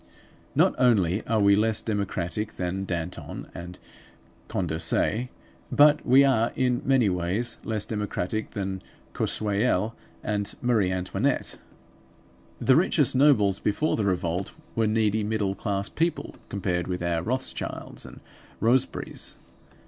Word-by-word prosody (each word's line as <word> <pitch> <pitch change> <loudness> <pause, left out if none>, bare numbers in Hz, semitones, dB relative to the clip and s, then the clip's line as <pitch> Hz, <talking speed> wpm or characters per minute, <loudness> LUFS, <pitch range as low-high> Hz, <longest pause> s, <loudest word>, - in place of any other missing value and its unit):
Not - - +4
only 105 -6 +3
are 110 -1 +2
we 100 -1 +5
less 110 +1 +2
democratic 105 -1 -2
than 95 +2 -3
Danton 85 -1 -5
and 90 +1 -8 0.7
Condorcet, 85 +7 0 0.4
but 150 +1 +5
we 135 +3 +6
are 120 -4 +2
in 125 -2 +1
many 130 -4 +3
ways 95 +6 -1
less 110 -2 -2
democratic 105 -1 -3
than 95 -2 -3 0.3
Choiseul 105 0 0 0.3
and 100 -1 -1
Marie 110 -7 +2
Antoinette. 95 0 -1 1.0
The - - +4
richest - - +3
nobles 120 -9 +4
before 130 +10 0
the 105 - -1
revolt 90 -1 -1 0.2
were 115 -1 +2
needy 110 0 +1
middle 105 -2 0
class 100 -1 -2
people 165 +1 -2 0.2
compared 90 -3 -2
with 90 -1 -3
our 85 -1 0
Rothschilds 130 +8 -4
and - - -12 0.4
Roseberys. 120 +3 0
105 Hz, 120 wpm, -26 LUFS, 95-115 Hz, 1.0 s, we